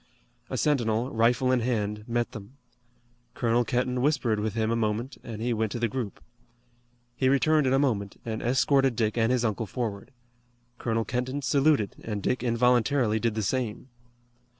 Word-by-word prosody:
A - - -3
sentinel, 120 -4 +1
rifle 120 +3 +2
in 130 - +3
hand, 105 -3 -2
met 120 0 -1
them. 110 -1 -10 0.8
Colonel 120 +1 +2
Kenton 125 +1 -1
whispered 130 -6 +1
with 110 +1 -2
him 110 0 0
a - - +1
moment, 115 +3 -2
and 110 -1 -6
he 120 0 +1
went 110 -1 -1
to - - -3
the 120 - +1
group. 110 -2 -5 0.9
He 130 +1 +2
returned 150 +1 +3
in 130 - +2
a - - +4
moment 110 -8 -1
and 110 -1 -3
escorted 135 +1 +2
Dick 110 -1 0
and 115 0 +2
his 125 -2 +1
uncle 110 0 -1
forward. 105 -4 -4 0.7
Colonel 115 -1 -1
Kenton 130 +3 -3
saluted 140 -6 +2
and 105 -3 -4
Dick 125 - 0
involuntarily 120 -1 +2
did 115 -1 0
the 110 - -1
same. 125 +2 -2
120 Hz, 170 wpm, -27 LUFS, 110-130 Hz, 0.9 s, a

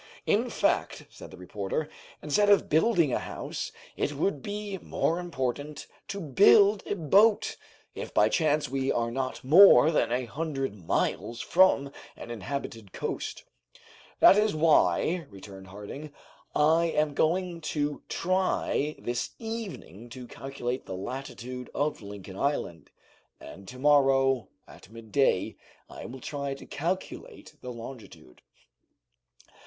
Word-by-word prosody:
"In - - +1
fact," - - 0
said - - -11
the 95 - -12
reporter, 100 - -4 0.4
"instead 205 +8 +2
of 205 - +4
building 160 - +3
a - - +1
house - - -5 0.2
it 145 - -1
would 145 0 -1
be 205 0 -5
more 165 +1 -1
important 145 -3 -4 0.2
to 200 - -5
build 200 +6 +5
a - - -1
boat, 200 +6 +3 0.4
if - - -7
by - - +4
chance 155 -3 +1
we 135 +1 -1
are 115 0 -1
not 130 +1 -3
more 160 +2 +8
than 150 - +1
a 125 +1 0
hundred 135 -1 -3
miles 105 +4 -2
from 170 -6 +3 0.3
an - - -8
inhabited 115 -2 -6
coast." - - -4 0.8
"That 195 - +8
is 210 -4 +1
why," 155 - +2
returned 95 -1 -12
Harding, 105 +10 -9 0.4
"I 160 +3 +4
am 150 -2 0
going 170 +3 0
to 145 -1 -1
try 185 -5 0
this 120 0 -4
evening 210 - -7
to 125 +1 -9
calculate 130 0 -5
the 95 - -5
latitude 125 +3 -7
of 145 -3 -1
Lincoln 100 -2 -9
Island, 85 - -2 0.5
and 95 +6 -12
to 125 - -9
morrow, 135 -2 +3 0.2
at - - -15
midday, 110 -2 0 0.3
I - - -10
will 130 +1 -9
try 140 0 -4
to - - -12
calculate 175 +6 -5
the 125 - -6
longitude." 115 - -11
140 Hz, 130 wpm, -28 LUFS, 120-165 Hz, 0.8 s, more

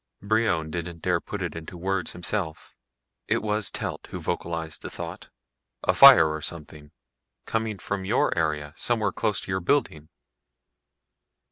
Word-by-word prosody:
Brion 100 -7 +1
didn't 85 0 -5
dare 90 -2 +1
put 100 -2 -5
it 85 - -4
into 80 +2 -8
words 95 0 -2
himself; 90 -2 -3 0.5
it - - +1
was 105 -1 +1
Telt - - -5
who - - -5
vocalized 80 -2 -3
the - - -6
thought. - - -7 0.5
"A - - +3
fire 135 -12 +9
or 80 0 -3
something. 75 -2 -7 0.5
Coming 110 -2 -2
from 100 +1 -4
your 105 +6 +1
area, 75 -2 -1
somewhere 110 -4 0
close 100 +1 -1
to - - -6
your 95 - 0
building." 85 - 0
90 Hz, 145 wpm, -26 LUFS, 80-105 Hz, 0.5 s, fire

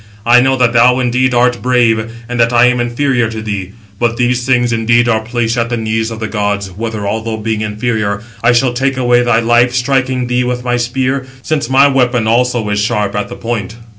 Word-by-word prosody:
I 120 +1 +5
know 135 +1 +1
that 125 -2 +2
thou 120 +2 +4
indeed 125 0 +1
art 125 0 +2
brave, 115 -3 +1 0.2
and 120 0 -4
that 115 0 +3
I 120 0 +4
am 125 0 +2
inferior 120 -1 0
to 110 -1 -6
thee. 100 -3 -5 0.3
But 115 -1 0
these 125 0 0
things 120 -2 +2
indeed 120 +1 +2
are 110 -2 +2
placed 115 +1 -2
at 115 0 -1
the 120 - -2
knees 110 0 -2
of 115 -1 -7
the 110 - -3
gods, 105 -2 -2
whether, 110 +1 -5
although 110 +1 -3
being 110 0 -3
inferior, 105 -1 -2 0.2
I 115 - +4
shall 120 +1 +2
take 135 +2 -1
away 120 -1 +3
thy 120 -1 +2
life, 120 +1 +2
striking 130 0 0
thee 125 0 0
with 125 0 -3
my 125 0 0
spear, 130 +2 -2 0.2
since 155 -4 -2
my 135 +2 +5
weapon 125 -4 +1
also 120 -1 +1
is 105 - 0
sharp 105 -2 -1
at 105 0 -3
the - - -7
point." 115 -3 -4
120 Hz, 215 wpm, -14 LUFS, 110-125 Hz, 0.3 s, I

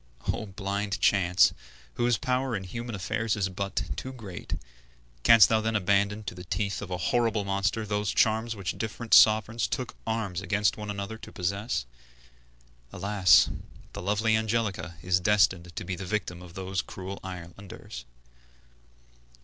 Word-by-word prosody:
O 110 - -5
blind 100 0 -3
Chance! 90 -2 +4 0.4
whose 120 - +1
power 125 +1 -1
in 95 - -3
human 115 +5 -5
affairs 110 +3 -1
is 100 -2 0
but 100 +1 -2
too 130 - -6
great, 105 -9 -7 0.7
canst 110 - +8
thou 110 -1 +2
then 110 0 -1
abandon 100 +2 +1
to 90 - -5
the 90 0 -9
teeth 100 +3 -2
of 105 - -6
a 90 - -2
horrible 115 +1 +1
monster 100 +3 0
those 105 -1 -1
charms 110 +1 +2
which 95 -3 -4
different 110 +1 -3
sovereigns 110 +1 +6
took 125 -2 -4
arms 110 -5 -2
against 100 +3 +1
one 105 -1 -7
another 100 +2 -5
to - - -10
possess? 100 - -2 1.1
Alas! 100 -1 +4 0.4
the - - -6
lovely 105 +4 +2
Angelica 110 -6 -1
is 90 0 +2
destined 95 -3 +2
to - - -5
be 90 0 -3
the 95 - -7
victim 90 -3 -3
of 90 -1 -12
those 95 0 -2
cruel 95 +1 -7
islanders. 90 -8 -9
100 Hz, 150 wpm, -28 LUFS, 95-110 Hz, 1.1 s, canst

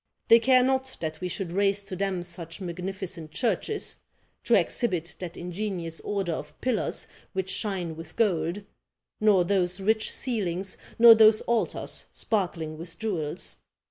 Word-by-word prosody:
They 230 - +9
care 255 +1 +5
not 265 0 0
that 155 -1 -4
we 180 - -1
should 180 -2 -4
raise 200 +2 +2
to 195 -1 -6
them 190 -2 -1
such 170 0 -7
magnificent 180 -2 -5
churches, 240 - -1 0.5
to - - +5
exhibit 180 -8 0
that 180 -2 -6
ingenious 175 -2 -4
order 195 -4 -2
of 150 -2 -6
pillars 250 -4 0 0.3
which 190 -1 -2
shine 185 -6 -2
with 160 0 -10
gold, 180 -2 +1 0.6
nor 210 -4 +5
those 185 -1 +1
rich 220 +3 +1
ceilings, 190 -6 -2 0.2
nor 235 0 +10
those 220 -1 +6
altars 235 -2 -1
sparkling 170 -7 -2
with 165 0 -7
jewels. 180 -10 -2
190 Hz, 140 wpm, -27 LUFS, 170-215 Hz, 0.6 s, nor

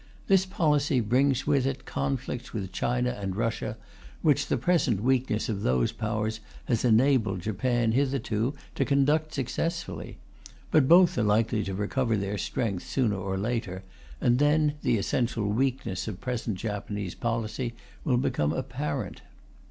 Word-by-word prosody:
This 190 -1 +3
policy 150 -6 +2
brings 130 +4 +2
with 140 -3 +2
it 135 0 -4
conflicts 135 -2 -3
with 95 -5 -4
China 125 +1 0
and 100 -4 -4
Russia, 115 +2 -2 0.5
which 150 -3 +3
the - - +1
present 130 - +2
weakness 125 -4 +1
of 105 -3 -2
those 65 -5 +2
Powers 110 0 -2 0.3
has 115 -3 0
enabled 115 -5 +3
Japan, 115 +4 0
hitherto, 130 -1 0 0.2
to - - +1
conduct 150 +3 +2
successfully. 165 +5 -3 0.5
But 145 -4 +5
both 175 -4 +6
are - - +2
likely 110 +1 +2
to 95 - -3
recover 110 +3 0
their 100 +1 -2
strength 100 -2 -2
sooner 120 -6 0
or 95 0 -3
later, 100 -3 -2 0.4
and 120 +1 +3
then 150 0 +3
the 115 - +2
essential 115 +1 0
weakness 120 -4 -1
of 105 -3 -5
present 125 -5 -3
Japanese 105 -2 -4
policy 115 +1 -2 0.3
will 130 -7 +2
become 75 - 0
apparent. - - -3
120 Hz, 145 wpm, -27 LUFS, 105-135 Hz, 0.5 s, both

